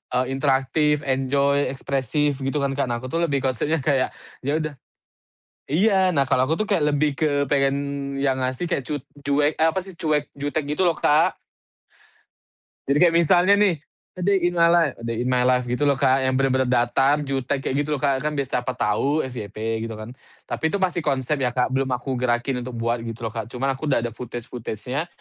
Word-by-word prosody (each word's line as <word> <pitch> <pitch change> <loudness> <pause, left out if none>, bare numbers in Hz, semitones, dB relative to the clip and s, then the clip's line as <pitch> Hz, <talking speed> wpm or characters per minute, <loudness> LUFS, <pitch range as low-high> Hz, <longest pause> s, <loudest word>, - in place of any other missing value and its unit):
eee, 125 +1 +2
interaktif, 140 +2 +1
enjoy, 140 +1 +1
ekspresif, 140 +2 -1
gitu 140 +2 -1
kan, 135 - 0
Kak. 140 - +1
Nah, 120 -1 -2
aku 130 - -5
tuh 165 - 0
lebih 140 -4 0
konsepnya, 135 +4 0
kayak 135 -2 +1 0.3
ya 145 - +1
udah 155 -1 -4 1.0
iya, 190 +2 +3
nah, 140 -2 +2
kalau 130 0 +3
aku 160 - +1
tuh - - -3
kayak - - +2
lebih 145 -1 +1
ke 155 -1 +2 0.2
pengen 135 -1 +2 0.5
yang 135 -1 +1
ngasih 130 +6 -2
kayak 135 - -1
cu 150 -1 -3 0.2
cuek 145 +2 +2
eh, 160 - +4
apa 190 - -1
sih, 185 -1 -12
cuek, 150 -2 0
jutek 145 +2 -2
gitu 190 - +2
loh, 170 - +3
Kak. 155 +5 +3 1.6
Jadi 140 - +4
kayak 170 -2 +5
misalnya 175 +3 +5
nih, 200 -6 +3 0.4
"A 180 - -4
day 200 -1 +3
in - - -8
my 170 - +6
life 170 -5 +3
a 115 - -10
day 115 -1 -2
in 125 - -1
my 125 0 +2
life," 125 0 +3
gitu 135 +4 +1
loh 140 - +4
Kak, 135 0 +3
yang 130 - +1
bener-bener 130 -1 +2
datar, 135 +4 +2
jutek 135 0 -2
kayak - - -1
gitu 150 +1 -1
loh, 140 - -4
Kak, 140 -2 +2
kan 150 0 -1
biar 140 - 0
siapa 125 +1 -1
tahu 140 +9 +1
FYP, 110 -2 -4
gitu 115 - -6
kan. 110 +2 -8 0.4
Tapi - - -4
itu 200 - 0
masih 180 -1 +1
konsep 135 +2 0
ya, 125 -2 0
Kak, 125 +1 +1
belum 135 0 0
aku 130 +2 -3
gerakin 125 +1 0
untuk 125 0 -7
buat, 115 +1 0
gitu 115 +1 -7
loh, 110 - -3
Kak, 115 -2 -4
cuman 130 +2 -2
aku 155 - -5
udah 125 -4 +2
ada 120 - -2
footage-footagenya, 120 +4 -5
135 Hz, 210 wpm, -23 LUFS, 125-150 Hz, 1.6 s, my